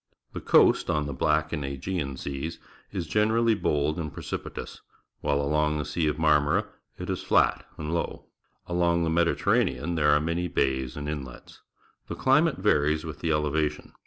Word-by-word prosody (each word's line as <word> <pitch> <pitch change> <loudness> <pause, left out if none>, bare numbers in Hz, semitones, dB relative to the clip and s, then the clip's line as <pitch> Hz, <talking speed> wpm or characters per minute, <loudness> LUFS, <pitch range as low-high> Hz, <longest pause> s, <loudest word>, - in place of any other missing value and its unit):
The - - -5
coast - - +4
on 75 -1 +1
the 70 - -4
Black 75 +3 +1
and 75 -3 -2
Aegean 70 +1 -3
Seas 70 +5 -5 0.3
is 95 -4 -3
generally 110 +5 +2
bold 75 -5 0
and 75 -3 -4
preci - - -4
pitous, - - -8 0.4
wliile 70 -1 +1
along 75 +1 +1
the 75 - -3
Sea 80 -3 -1
of 75 - -1
Marmora 75 -2 +3 0.3
it - - -6
is - - -2
flat - - +2
and 75 +1 -4
low. 85 - -3 0.4
Along 85 -1 +1
the 80 - 0
Mediterranean 85 -3 +1
there 75 -3 +2
are 75 0 +5
many 85 +3 -1
bays 65 -4 -1
and 75 0 -5
inlets. 70 -5 -7 0.5
The - - -5
chmate - - +3
varies 75 +2 +2
with 80 - -7
the 80 - -1
elevation. 75 0 -1
75 Hz, 170 wpm, -27 LUFS, 75-85 Hz, 0.5 s, are